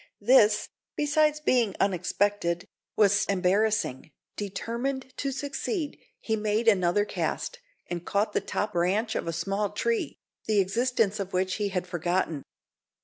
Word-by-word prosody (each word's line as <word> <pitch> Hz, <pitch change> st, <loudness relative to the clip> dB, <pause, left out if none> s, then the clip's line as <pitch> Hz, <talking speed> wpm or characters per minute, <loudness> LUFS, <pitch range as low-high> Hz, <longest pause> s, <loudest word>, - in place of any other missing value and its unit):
This, 215 Hz, -3 st, +5 dB, 0.3 s
besides 300 Hz, +1 st, +2 dB
being 245 Hz, -8 st, +2 dB
unexpected, 185 Hz, -1 st, 0 dB, 0.3 s
was 205 Hz, 0 st, +4 dB
embarrassing. 195 Hz, -6 st, +1 dB, 0.3 s
Determined 240 Hz, +6 st, -3 dB
to 275 Hz, -, -1 dB
succeed, 285 Hz, -, -3 dB, 0.2 s
he 220 Hz, -, -1 dB
made 215 Hz, +2 st, 0 dB
another 200 Hz, -1 st, +4 dB
cast, 485 Hz, -, -3 dB, 0.3 s
and 175 Hz, -1 st, -5 dB
caught 205 Hz, +3 st, 0 dB
the -, -, +1 dB
top 210 Hz, 0 st, -2 dB
branch 195 Hz, +6 st, +1 dB
of -, -, -3 dB
a -, -, 0 dB
small 195 Hz, +5 st, -1 dB
tree, 230 Hz, +3 st, -1 dB, 0.3 s
the 215 Hz, -2 st, +3 dB
existence 220 Hz, +1 st, +1 dB
of 195 Hz, -1 st, -4 dB
which 185 Hz, 0 st, 0 dB
he 205 Hz, -2 st, -1 dB
had 185 Hz, -2 st, -2 dB
forgotten. 175 Hz, -3 st, -1 dB
205 Hz, 135 wpm, -27 LUFS, 185-235 Hz, 0.3 s, This